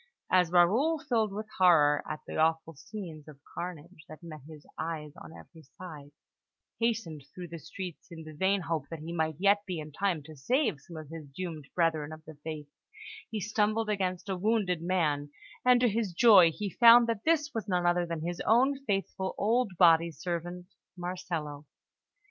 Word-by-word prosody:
As 180 -2 +4
Raoul, 220 - +4
filled 230 -7 0
with 210 +2 -5
horror 150 -5 +5
at 155 - -5
the - - -7
awful 160 +1 +1
scenes 160 -1 -9
of 150 -2 -12 0.2
carnage 175 -1 -7
that 155 +2 -12
met 155 -3 -9
his 155 -2 -13
eyes 155 -2 -5
on - - -12
every 160 0 -14 0.2
side, 155 -6 -10 0.7
hastened 225 -10 -1
through 180 -2 -8
the 170 0 -7
streets 180 +1 -8
in 165 -2 -9
the 155 0 -10
vain 190 +5 +1
hope 160 -4 -3
that 165 - -6
he 165 +2 -6
might 160 -2 -1
yet 200 +3 +3
be 180 -2 -3
in 155 -1 -7
time 175 -1 -1
to 155 +1 -12
save 215 - 0
some 170 +2 -11
of 155 -2 -9
his 160 -2 -9
doomed 155 0 -7
brethren 160 -3 0
of 155 0 -11
the 160 - -10
faith, 155 -2 -6 0.6
he 220 - -3
stumbled 215 +2 0
against 185 -1 -2
a 190 - -2
wounded 190 -3 0
man, 155 -5 0 0.3
and, 250 -1 +5
to 250 - +4
his 215 -4 -1
joy, 190 -4 +7
he 200 +4 -5
found 235 +2 +7
that 230 -3 -2
this 310 -2 +1
was 225 -2 -4
none 180 -2 0
other 175 0 +2
than 165 -2 -4
his 175 0 -4
own 265 +4 +3
faithful 195 -2 -2
old 225 -1 +1
body 170 -1 +5
servant, 175 +2 -5 0.3
Marcello. 170 -5 -5
175 Hz, 185 wpm, -29 LUFS, 160-205 Hz, 0.7 s, joy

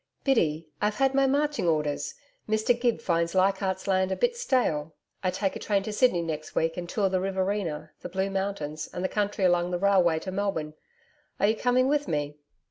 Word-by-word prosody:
'Biddy, 165 - +1
I've 210 0 +1
had 270 +3 +2
my 275 0 +4
marching 290 -5 +1
orders. 150 -3 0 0.3
Mr 220 +2 +3
Gibbs 240 -2 +1
finds 170 0 0
Leichardt's 190 0 +1
Land 190 -1 +2
a - - +1
bit 485 0 +1
stale. 205 - 0 0.3
I 185 - +1
take 195 +1 -1
train 200 -2 +1
to 215 - -4
Sydney 210 -7 +3
next 155 -2 -5
week 165 0 +1
and 175 -1 -5
tour 200 0 +1
the 185 -1 0
Riverina, 190 -5 -2
the 180 - -6
Blue 190 +2 -1
Mountains 190 -6 -3
and 180 - -5
the - - +2
country 205 -1 0
along 175 -1 +3
the 180 - -1
railway 185 -3 +4
line 160 - -2
to 185 - -5
Melbourne. 190 -6 -2 0.7
Are - - +3
you 215 +2 +3
coming 250 +2 +2
with 290 +1 +1
me?' 145 -1 -2
190 Hz, 200 wpm, -27 LUFS, 170-210 Hz, 0.7 s, my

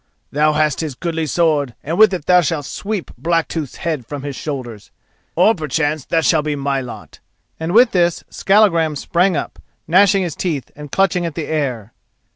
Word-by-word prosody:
Thou 150 +2 +2
hast 150 -2 +1
his 155 -5 -4
goodly 165 +1 -3
sword 150 -5 +1
and 160 +4 -2
with 215 0 +6
it 180 -6 -4
thou 180 0 +5
shalt 150 -2 -2
sweep 205 +4 -4
Blacktooth's 165 -3 -1
head 155 -6 -3
from 140 +4 -7
his 140 -2 -5
shoulders—or 135 - -3
perchance 155 - -2
that 165 -1 0
shall 160 -3 +3
be 150 0 -2
my 140 -1 -1
lot," 125 -2 -10 0.4
and 160 +1 -3
with 235 +4 +5
this 175 -2 +1
Skallagrim 180 -7 +3
sprang 175 +4 +1
up, - - -5 0.3
gnashing 195 +3 +4
his 170 -4 -3
teeth 155 -8 -3
and 150 -1 -10
clutching 190 -2 +1
at 160 - -7
the 160 - -3
air. 130 -8 -3
160 Hz, 175 wpm, -18 LUFS, 145-175 Hz, 0.4 s, with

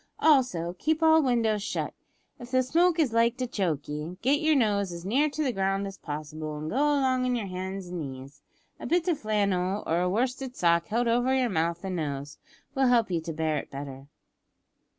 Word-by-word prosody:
Also 245 - +2
keep 315 +1 0
all 320 0 +6
windows 230 -6 +1
shut. - - -3 0.5
If 240 - -9
the 255 0 +2
smoke 335 +6 +3
is 290 -8 +2
like 230 +1 +3
to 255 - -1
choke 175 - -2
ye, 150 +4 -5
git 285 +5 +3
yer 310 0 +3
nose 205 -7 +1
as 170 0 -8
near 275 +10 +2
the 290 -2 -1
ground 195 0 0
as 195 0 -8
possible, 155 0 -6
an' 155 +1 -5
go - - -4
along 275 -3 +2
on 250 -1 +1
yer 230 -4 -2
hands 190 0 -5
and 180 -1 -4
knees. 140 0 -8 0.4
A - - -6
bit 350 +1 +1
o' 350 - +4
flannel 200 - 0
or 165 +2 +1
a 180 - +1
worsted 250 +5 -1
sock 170 -1 +2
held 235 +3 0
over 245 +3 +2
yer 255 -2 +2
mouth 170 0 -1
an' 185 -2 -3
nose, 145 -2 -4 0.3
will 270 -2 +2
help 235 -5 +3
you 170 -2 0
to 165 - -5
bear 155 -1 -1
it - - -9
better. 135 -1 -8
200 Hz, 205 wpm, -27 LUFS, 170-255 Hz, 0.5 s, all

